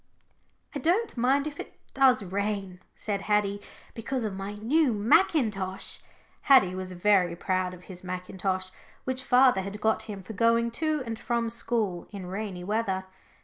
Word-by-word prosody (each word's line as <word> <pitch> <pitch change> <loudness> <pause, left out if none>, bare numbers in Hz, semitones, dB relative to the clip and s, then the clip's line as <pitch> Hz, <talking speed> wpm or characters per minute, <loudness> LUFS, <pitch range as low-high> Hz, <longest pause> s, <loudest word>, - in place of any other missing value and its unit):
"I 290 - -3
don't 365 - +1
mind 265 +4 +2
if 300 -2 -6
it - - -9
does 265 -5 +4
rain," 195 -1 -3 0.2
said 200 -2 -3
Haddie, 205 -1 +1 0.3
"because 245 +2 -3
of 210 - -3
my 195 +2 -5
new 255 +6 +2
mackintosh." 210 - +1 0.4
Haddie 255 -10 +6
was 185 0 -5
very 180 -2 +3
proud 185 +1 -1
of 180 - -16
his 180 -1 -11
mackintosh, 185 +1 -3 0.3
which 260 0 -2
father 250 -5 +5
had 200 +2 -6
got 220 +1 0
him 200 -2 -6
for 220 - -8
going 230 +2 +2
to 310 +2 0
and 225 -1 -5
from 235 -2 -1
school 220 -6 -2
in 200 -3 -7
rainy 190 -1 -5
weather. 195 -2 -1
210 Hz, 155 wpm, -28 LUFS, 190-245 Hz, 0.4 s, Haddie